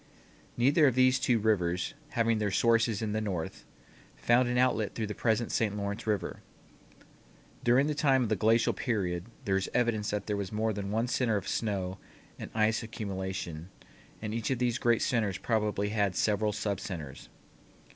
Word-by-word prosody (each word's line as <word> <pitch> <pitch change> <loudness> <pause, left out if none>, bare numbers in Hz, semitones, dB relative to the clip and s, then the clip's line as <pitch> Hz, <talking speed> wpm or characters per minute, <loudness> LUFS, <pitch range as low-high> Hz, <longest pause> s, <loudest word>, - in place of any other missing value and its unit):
Neither 145 +5 +5
of 130 - +2
these 130 0 +4
two 120 - +2
rivers, 90 -5 0 0.2
having 115 -1 +2
their 105 -1 0
sources 115 +1 +2
in 105 - -2
the 110 - 0
north, 95 -6 -4 0.5
found 120 +1 +3
an 125 - 0
outlet 125 -4 +1
through 110 - -2
the 105 - -4
present 115 +1 0
St. 105 -2 0
Lawrence 100 +2 -4
River. 105 -2 -2 1.2
During 125 +4 +4
the 150 - 0
time 135 -3 +3
of 115 - -2
the 110 - +2
glacial 110 +3 +3
period 90 -6 -2 0.2
there 95 -1 +2
is 95 - -2
evidence 115 -4 +1
that 105 -1 -2
there 105 - -1
was 100 -2 -4
more 110 +1 0
than 100 -1 -4
one 110 +3 0
center 120 -3 +1
of 100 - -5
snow 95 -4 -2 0.4
and - - -6
ice 110 +1 +2
accumulation 95 -6 -5 0.5
and 110 0 -3
each 115 -1 -2
of 130 - +1
these 120 0 0
great 120 -1 +2
centers 110 -6 0
probably 105 -3 0
had 100 -3 0
several 105 0 +1
subcenters. 95 -9 -5
110 Hz, 175 wpm, -30 LUFS, 100-115 Hz, 1.2 s, Neither